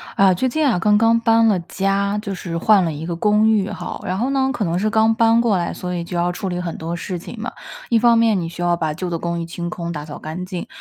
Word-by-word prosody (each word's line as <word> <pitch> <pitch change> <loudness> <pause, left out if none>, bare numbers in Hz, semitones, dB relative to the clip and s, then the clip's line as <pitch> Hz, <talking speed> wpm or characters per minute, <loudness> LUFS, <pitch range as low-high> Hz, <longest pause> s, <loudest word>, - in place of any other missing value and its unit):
啊， 195 -1 +5
最 260 +9 0
近 305 +5 0
啊， 225 - +1
刚 210 +3 +3
刚 230 +1 +4
搬 225 0 +4
了 200 -4 +3
家， 195 +3 -1
就 200 -2 -5
是 170 -2 -6
换 200 0 +4
了 165 - -2
一 150 +2 -6
个 170 - -3
公 210 +4 +3
寓 210 -3 +2
哈， 185 -4 -6
然 185 - -2
后 250 +4 0
呢， 265 -1 +1
可 230 - -2
能 170 -2 0
是 205 +4 0
刚 220 +1 +3
搬 230 0 +4
过 225 -5 +2
来， 170 -1 -2
所 180 0 -5
以 170 - -3
就 175 +1 -7
要 175 +1 +1
处 185 +2 -5
理 175 -1 -3
很 170 -2 -5
多 165 +1 -4
事 180 +1 -4
情 175 - -9
嘛。 230 - -4 0.4
一 235 - +4
方 235 +1 +5
面 225 -3 +3
你 170 - -3
需 170 +1 -8
要 175 0 +1
把 155 -2 -1
旧 180 +3 -4
的 170 - -2
公 170 0 -3
寓 - - -4
清 175 +1 -5
空、 170 -1 -4
打 150 -3 -6
扫 150 - -8
干 160 +4 -6
净， 180 -2 -6
185 Hz, 310 characters per minute, -20 LUFS, 170-220 Hz, 0.4 s, 啊